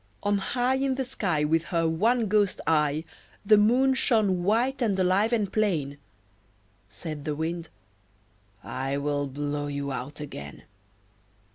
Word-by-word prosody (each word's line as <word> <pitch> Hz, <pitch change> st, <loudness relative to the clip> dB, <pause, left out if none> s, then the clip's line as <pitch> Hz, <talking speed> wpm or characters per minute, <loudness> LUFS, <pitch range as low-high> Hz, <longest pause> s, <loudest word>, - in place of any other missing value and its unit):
On 205 Hz, 0 st, +1 dB
high 250 Hz, +6 st, 0 dB
In 265 Hz, -1 st, 0 dB
the 265 Hz, -, -1 dB
sky 190 Hz, -, -1 dB
With 160 Hz, +2 st, +1 dB
her 165 Hz, -2 st, 0 dB
one 225 Hz, +9 st, +2 dB
ghost 205 Hz, -1 st, +2 dB
eye, 150 Hz, -1 st, +2 dB, 0.4 s
The 215 Hz, +1 st, +7 dB
Moon 250 Hz, +5 st, +4 dB
shone 215 Hz, -8 st, +2 dB
white 235 Hz, +8 st, +1 dB
and 205 Hz, -5 st, +1 dB
alive 190 Hz, +5 st, +2 dB
and 210 Hz, -5 st, 0 dB
plain. 155 Hz, -10 st, 0 dB, 0.9 s
Said 150 Hz, -, -7 dB
the 150 Hz, 0 st, -2 dB
Wind 165 Hz, +2 st, -3 dB, 0.9 s
"I 135 Hz, +2 st, -3 dB
will 145 Hz, 0 st, -1 dB
blow 145 Hz, +1 st, -3 dB
you 140 Hz, -1 st, -3 dB
out 135 Hz, +3 st, -6 dB
again." 70 Hz, -, -8 dB
175 Hz, 140 wpm, -27 LUFS, 145-220 Hz, 0.9 s, The